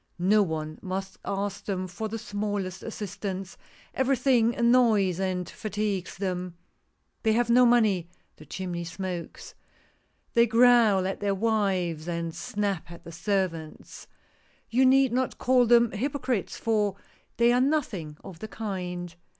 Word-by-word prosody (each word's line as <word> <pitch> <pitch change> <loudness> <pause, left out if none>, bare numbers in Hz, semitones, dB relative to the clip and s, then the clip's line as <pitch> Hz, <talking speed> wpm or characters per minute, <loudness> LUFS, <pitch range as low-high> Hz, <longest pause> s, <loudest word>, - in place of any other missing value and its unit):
No 200 +4 +4
one 155 -4 -3
must 190 0 -5
ask 200 0 -3
them 185 -2 -2
for 185 +5 -5
the 225 - -4
smallest 205 -4 -3
assistance 195 -3 -5 0.2
— - - -27
every 265 +1 +2
thing 240 -3 +3
annoys 230 -7 +3
and 185 -2 -1
fatigues 210 -3 -3
them 180 -2 -3 0.3
— - - -47
they 220 -1 +2
have 235 +1 +1
no 250 +1 +6
money 210 -8 +3
— - - -43
the 155 - -14
chimney 175 +1 -4
smokes 175 0 -6 0.4
— - - -42
they 235 0 +5
growl 230 -4 +5
at 190 - -3
their 200 -1 0
wiveSj^ 190 -7 0
and 170 -1 -3
snap 195 0 -3
at 170 0 -11
the 170 - -10
servants. 165 -2 -3 0.6
You 260 +3 +4
need 265 -1 +4
not 255 +1 -1
call 250 -1 +3
them 235 -1 +5
hypocrites, 255 -1 -2
fox 210 -3 0 0.4
they 235 0 +5
are 250 - +3
nothing 225 - -1
of 175 -4 -10
the 220 - -6
kind. 180 -5 -5
200 Hz, 150 wpm, -27 LUFS, 180-230 Hz, 0.6 s, no